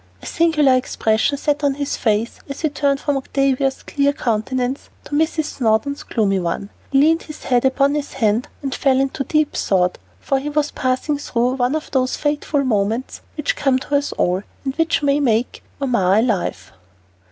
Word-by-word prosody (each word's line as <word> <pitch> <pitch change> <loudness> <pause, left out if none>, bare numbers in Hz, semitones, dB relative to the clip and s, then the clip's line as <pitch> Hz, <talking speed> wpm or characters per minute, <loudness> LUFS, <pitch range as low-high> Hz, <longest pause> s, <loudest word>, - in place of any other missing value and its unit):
A - - -14
singular 310 -5 +3
expression 250 +1 +1
sat 295 +1 -1
on 280 -1 +2
his 285 0 -2
face 220 +1 0
as 275 - -6
he 310 - +1
turned 280 -1 0
from 290 -1 0
Octavia's 270 0 0
clear 285 0 +1
countenance 250 +2 -2
to - - -14
Mrs. 315 +2 +1
Snowdon's 245 +4 +1
gloomy 200 -4 0
one. 180 +3 -3 0.2
He 275 - +3
leaned 325 +3 +4
his 305 - -10
head 245 0 +2
upon 275 +2 +3
his 295 -1 -3
hand 225 -1 +1 0.2
and 270 -1 -2
fell 265 -2 +2
into 275 +2 -1
deep 305 +1 +1
thought, 180 -2 +1 0.2
for 270 - 0
he 290 +2 -4
was 295 0 0
passing 260 +3 -1
through 245 -3 0
one 250 +3 +1
of 310 - -4
those 255 -1 +1
fateful 290 -1 0
moments 225 0 -1 0.2
which 300 - -1
come 270 -3 +2
to 285 +2 -2
us 285 0 0
all, 180 +2 0 0.2
and 270 0 -2
which 325 -2 +1
may 285 0 +3
make 240 -4 0 0.2
or 275 - -1
mar 195 -6 +3
a 220 - +5
life. 190 - -2
270 Hz, 185 wpm, -20 LUFS, 235-290 Hz, 0.2 s, a